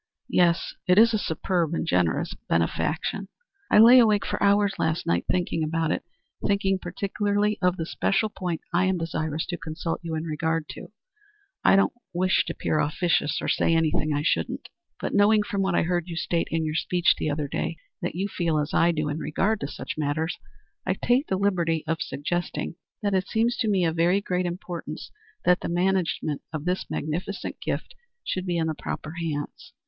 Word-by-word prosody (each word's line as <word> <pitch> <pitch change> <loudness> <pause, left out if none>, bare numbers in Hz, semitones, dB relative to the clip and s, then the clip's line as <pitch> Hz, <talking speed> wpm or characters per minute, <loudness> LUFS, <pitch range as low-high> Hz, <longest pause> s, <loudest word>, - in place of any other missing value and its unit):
"Yes. 170 -1 +2
It 180 +1 +5
is 225 +1 +7
a 215 - +2
superb 170 -2 -1
and - - -1
generous 90 - +1 0.2
benefaction." 160 - 0 0.4
"I - - +5
lay 235 +4 +9
awake 215 -4 +4
for - - -3
hours 200 0 +4
last 160 0 0
night 85 0 +1
thinking 175 -3 0
about 160 0 0
it; - - 0 0.4
thinking 195 -1 +1
particularly 205 +3 -1
of 180 0 +2
the 165 - -2
special 195 +5 +1
point 180 -5 -4
I 180 +2 +3
am 190 -1 +1
desirous 160 -1 -2
to 175 - -4
consult 160 +1 -4
you 165 -1 -3
in 155 - -2
regard 160 0 -1
to. - - -8 0.8
I - - +6
don't 195 - +3 0.2
wish 185 +1 +2
to - - -3
appear 155 - -1
officious, 150 -1 +1
or - - -2
to - - +3
say 165 - +2
anything 155 -1 +1
I 145 0 0
shouldn't, 85 - -1 0.3
but - - -3
knowing 210 +1 +5
from 200 -1 -2
what 190 -2 +1
I - - +3
heard 175 0 -1
you 170 - -5
state 170 0 0
in 160 0 0
your 155 - -2
speech 175 +2 +2
the - - 0
other 145 0 -1
day - - -3 0.2
that - - -3
you 190 +3 -1
feel 170 -5 0
as 150 +1 -1
I 170 - +4
do 155 -2 -1
in 150 +1 -2
regard 200 +9 0
to 140 - -3
such 145 - -6
matters, 155 +3 -1 0.5
I - - 0
take 255 +5 +1
the 190 - 0
liberty 175 -5 +1
of 165 0 -1
suggesting 175 +4 -3 0.3
that 205 -1 +1
it 190 0 +1
seems 230 +2 +1
to 235 - 0
me 195 -4 +2
of 165 0 -1
very 175 +4 +4
great 180 -2 -1
importance 175 -3 -6 0.3
that 180 - +5
the - - -4
management 175 -4 0
of 155 -1 -5
this 180 +1 -1
magnificent 180 +6 -4
gift - - -3 0.3
should 185 0 -3
be 175 -1 0
in 160 -1 0
proper 155 0 -5
hands. 150 -3 -5
175 Hz, 195 wpm, -26 LUFS, 160-195 Hz, 0.8 s, lay